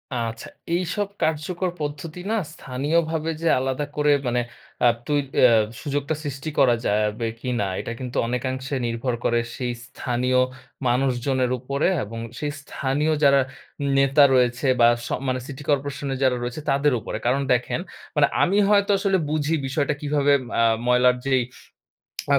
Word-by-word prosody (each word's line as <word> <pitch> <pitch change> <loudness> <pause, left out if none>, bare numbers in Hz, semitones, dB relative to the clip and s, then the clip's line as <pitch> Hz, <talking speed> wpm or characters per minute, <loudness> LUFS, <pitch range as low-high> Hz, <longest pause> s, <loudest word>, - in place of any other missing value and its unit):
আচ্ছা। 115 -1 -3 0.3
এইসব 185 +3 -1 0.2
কার্যকর 165 +4 -1
পদ্ধতি 150 +3 -5
না, - - +2 0.2
স্থানীয়ভাবে 155 +5 -1
যে 165 - 0
আলাদা 135 +2 -1
করে, 150 0 +3 0.2
মানে 120 0 +1 0.4
আ - - +8 0.2
তুই 145 -1 +2 0.2
এ - - +5 0.4
সুযোগটা 145 0 -2
সৃষ্টি 140 +1 -4
করা 125 -3 +6
যা-বে 105 +2 0
কিনা, 120 -4 -1
এটা - - -5
কিন্তু 125 -2 -5
অনেকাংশে 130 +2 -2
নির্ভর 115 +2 -2
করে 120 0 +3 0.2
সেই 125 -2 -2
স্থানীয় 125 +1 0 0.5
মানুষজনের 125 0 +1
উপরে, 140 +3 -1 0.2
এবং 115 +2 -7 0.2
সেই 150 -1 -2
স্থানীয় 145 +3 -1
যারা 140 -1 +6 0.6
নেতা 135 +1 +5
রয়েছে, 125 +1 +2
বা 115 - +7 0.2
স - - -5 0.2
মানে 130 0 0
সিটি 140 0 -8
করপোরেশন 140 0 -1
এর - - -3
যারা 130 -1 +3
রয়েছে 120 +5 -4
তাদের 140 +1 +3
উপরে। 110 - -5
কারণ 130 +3 +2
দেখেন 125 0 -1 0.4
মানে - - +5 0.2
আমি 195 +3 +2
হয়তো 205 0 +4
আসলে 195 -1 +2
বুঝি 155 +1 0
বিষয়টা, 140 +2 0
কিভাবে 145 -1 +2
ম - - -10
আ - - +4 0.2
ময়লার 125 0 +4
যেই 130 -2 +3 0.9
আ - - +7
135 Hz, 155 wpm, -23 LUFS, 125-150 Hz, 0.9 s, আ